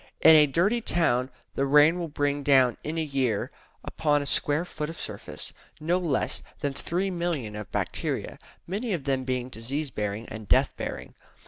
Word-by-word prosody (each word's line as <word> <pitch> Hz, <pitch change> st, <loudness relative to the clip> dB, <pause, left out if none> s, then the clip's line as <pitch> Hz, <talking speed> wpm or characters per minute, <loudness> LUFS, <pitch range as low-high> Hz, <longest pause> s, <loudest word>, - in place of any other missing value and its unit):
In 160 Hz, -, +9 dB
a 150 Hz, -1 st, +7 dB
dirty 195 Hz, -, +2 dB
town 130 Hz, -, +1 dB, 0.2 s
the 140 Hz, -, 0 dB
rain 150 Hz, +5 st, +6 dB
will 170 Hz, -, -2 dB
bring 145 Hz, -1 st, -1 dB
down 135 Hz, -3 st, +4 dB
in 160 Hz, +2 st, -3 dB
a 160 Hz, -, +1 dB
year, 130 Hz, -8 st, -1 dB, 0.3 s
upon 145 Hz, -2 st, +1 dB
a -, -, -7 dB
square 150 Hz, +3 st, +1 dB
foot 150 Hz, -3 st, -5 dB
of 165 Hz, -, -8 dB
surface, -, -, -6 dB, 0.3 s
no 170 Hz, +4 st, +1 dB
less 165 Hz, -7 st, -1 dB, 0.2 s
than 140 Hz, -1 st, -1 dB
3,000,000 170 Hz, -, -2 dB
of 105 Hz, -, -11 dB
bacteria, -, -, -3 dB, 0.3 s
many 205 Hz, +5 st, -2 dB
of 165 Hz, -6 st, -2 dB
them 135 Hz, -2 st, 0 dB
being 125 Hz, -1 st, -2 dB
disease 130 Hz, +5 st, -4 dB
bearing 105 Hz, +1 st, -3 dB
and 110 Hz, -1 st, -8 dB
death -, -, +3 dB
bearing. -, -, -6 dB
145 Hz, 175 wpm, -27 LUFS, 130-165 Hz, 0.3 s, In